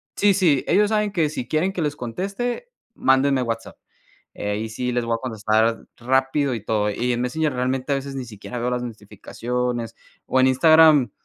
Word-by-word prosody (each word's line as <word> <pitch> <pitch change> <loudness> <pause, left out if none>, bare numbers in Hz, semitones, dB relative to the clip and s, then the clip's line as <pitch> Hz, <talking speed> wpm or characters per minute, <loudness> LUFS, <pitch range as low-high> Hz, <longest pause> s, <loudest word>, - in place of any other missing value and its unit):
sí, 205 -1 +4
sí, 170 -8 +2
ellos 210 +1 +3
saben 210 -1 +1
que 165 -6 +1
si 125 -6 -5
quieren 175 +5 0
que 175 - -3
les 145 -1 -2
conteste, 200 - -4 0.3
mándenme 135 0 +3
WhatsApp. 115 -1 -4 0.6
Eh, 105 0 -2
y 110 0 -4
sí 125 +3 -3
les 120 -1 0
voy 115 - 0
a - - -2
contestar 110 -1 0
rápido 130 +2 +1
y 110 - -5
todo. 105 -1 0
Y 125 +4 -1
en 120 - -2
Messenger 150 +4 -1
realmente 130 +2 -1
a - - +4
veces 135 0 -6
ni 130 - -4
siquiera 115 +3 -8
veo 120 +1 -1
las 125 0 -2
notificaciones. 120 +2 -4 0.3
O 130 - +2
en 130 - +5
Instagram, 155 -2 +5
130 Hz, 190 wpm, -22 LUFS, 115-155 Hz, 0.6 s, en